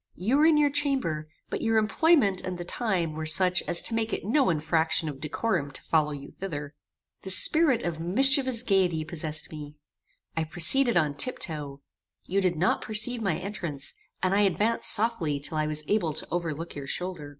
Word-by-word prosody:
You 225 +10 0
were 305 +2 +5
in 320 -2 +4
your 295 -1 +3
chamber, 265 - -1 0.2
but - - -3
your 225 0 +1
employment 220 - +3
and 185 -1 -5
the 175 - -6
time 180 -7 -1
were 155 0 -4
such 180 +3 +3
as 170 - +2
to - - -1
make 225 0 -1
it - - -4
no 260 +4 +2
infraction 160 0 0
of 145 -3 -6
decorum 160 -1 -2
to 140 - -10
follow 155 -2 +1
you 140 -1 -8
thither. 150 -6 -6 0.5
The 190 - -7
spirit 270 - +3
of 170 -2 -3
mischievous 260 - +3
gaiety 180 -7 +1
possessed 155 -1 -3
me. 150 -1 -9 0.6
I 160 - 0
proceeded 175 - +4
on 150 -4 +1
tiptoe. 145 - -2 0.4
You 195 +2 0
did 180 -2 +1
not 175 +5 +1
perceive 220 +3 0
my 195 -3 0
entrance; 170 -8 -4 0.3
and 185 0 +2
I 200 - +3
advanced 205 +4 +1
softly 205 -10 +1
till 155 +2 -3
I 155 - 0
was 155 0 0
able 180 -7 0
to 155 - -3
overlook 165 -1 -4
your 140 -1 -8
shoulder. 180 -4 -5
180 Hz, 185 wpm, -27 LUFS, 155-225 Hz, 0.6 s, were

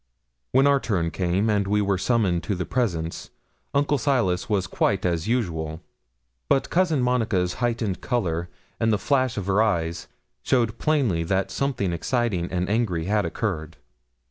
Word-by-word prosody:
When 135 +2 +4
our 140 -1 +4
turn 90 -10 -1
came 95 +4 0
and 100 -2 +1
we 105 +1 +2
were 100 -2 +1
summoned 100 -7 +1
to 100 - -1
the 90 - -3
presence, 85 -10 -2 0.4
Uncle 145 0 +1
Silas 115 -11 +1
was 100 -3 +1
quite 95 +1 0
as 85 +1 0
usual; 80 -10 -1 0.7
but 135 - +2
Cousin 170 -7 +2
Monica's 110 -8 +1
heightened 115 -5 -1
colour, 85 -9 -1 0.3
and 115 0 +2
the 105 - +3
flash 130 -1 +1
of 100 - -2
her 100 +2 +2
eyes, 85 -6 0 0.3
showed 115 -3 +1
plainly 135 - +1
that 95 +2 0
something 130 -10 -1
exciting 95 -1 -1
and 90 0 -1
angry 100 -7 0
had 105 0 +1
occurred. 85 -3 -3
105 Hz, 155 wpm, -24 LUFS, 90-120 Hz, 0.7 s, When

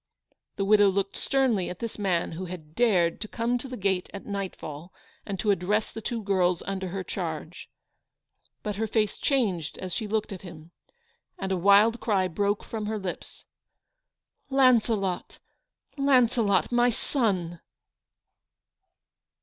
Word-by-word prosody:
The 195 - -1
widow 205 0 +6
looked 195 0 -1
sternly 255 -9 +1
at 180 - -6
this 230 0 -6
man 185 -4 0
who 175 +3 -5
had 165 -4 -9
dared 180 -7 +2
to 215 - -3
come 235 +2 -1
to 270 - -7
the 255 -1 -6
gate 190 -2 0
at 200 - -8
nightfall 185 -5 -5 0.4
and 195 -3 -4
to 210 - +2
address 200 +3 0
the 225 - -7
two 230 0 -3
girls 185 -3 +1
under 190 -1 -3
her 190 +1 -4
charge. - - -5 0.9
But 210 -2 -3
her 220 +1 0
face 215 0 +1
changed 195 - 0
as 185 -2 -5
she 215 - -2
looked 215 0 -1
at 190 - -6
him, 170 -3 -11 0.7
and 190 -1 -3
a - - +2
wild 200 +5 +5
cry 195 -4 +1
broke 200 +4 0
from 215 -2 -5
her 220 0 -1
lips. 190 -3 -7 1.0
"Launcelot, 230 -8 +2 0.6
Launcelot, 245 -8 +3
my 240 0 +4
son 195 - -1
200 Hz, 145 wpm, -27 LUFS, 185-225 Hz, 1.0 s, widow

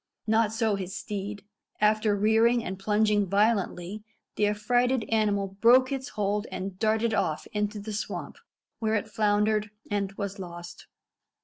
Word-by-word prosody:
Not 220 -1 +2
so 225 -1 +1
his 190 -1 -4
steed. 205 0 -5 0.3
After 215 0 +3
rearing 225 +3 +3
and 190 +1 -5
plunging 210 0 +2
violently, 200 -1 0 0.3
the 210 - +2
affrighted 245 +4 +1
animal 205 -3 +1
broke 255 +3 +6
its 270 0 -3
hold 205 +1 -1
and 185 0 -5
darted 220 +1 +1
off 175 -7 0
into 210 0 -1
the 210 +1 -6
swamp, 215 - -5 0.4
where 220 -1 +1
it 215 0 -1
floundered 210 0 +1 0.2
and 200 -1 -1
was 200 0 -5
lost. 175 -2 -9
210 Hz, 140 wpm, -27 LUFS, 200-220 Hz, 0.4 s, broke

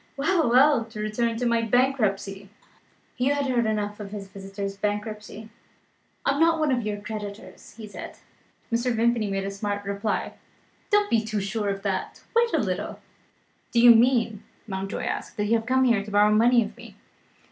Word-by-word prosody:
Well! 320 0 +2
well! 260 0 +5
to 220 -1 -10
return 225 +2 -1
to 250 - -2
my 235 -1 +2
bankruptcy." 215 -5 0 0.7
Hugh 265 +3 +2
had 285 -1 -1
heard 245 -4 +1
enough 210 -1 -2
of 205 -1 -7
his 200 -1 -7
visitor's 195 0 -6
bankruptcy. 210 +1 -4 0.8
"I - - +4
am 280 - -1
not 330 0 +4
one 310 -3 +1
of 250 -2 +1
your 210 -2 -3
creditors," 210 -1 -8
he 220 - -8
said. 205 - -9 0.6
Mr. 240 +2 +1
Vimpany 230 -2 +1
made 195 0 -2
a 195 - -3
smart 205 0 -4
reply: 200 +2 -2 0.6
"Don't 415 - +2
you 230 - +5
be - - -4
too 215 -1 -2
sure 200 +1 -2
of 195 0 -3
that. 195 -2 -3
Wait 465 0 +3
a - - +2
little." - - -2 0.7
"Do 235 - +2
you 240 0 +9
mean," 230 -3 +2 0.2
Mountjoy 195 -1 -4
asked, - - -4
"that 210 - 0
you 215 - +1
have 225 0 0
come 260 +1 +3
here 230 -6 +3
to 210 - -9
borrow 205 +1 +4
money 235 +2 +5
of 210 +1 -9
me?" 235 -4 -13
220 Hz, 190 wpm, -25 LUFS, 205-245 Hz, 0.8 s, you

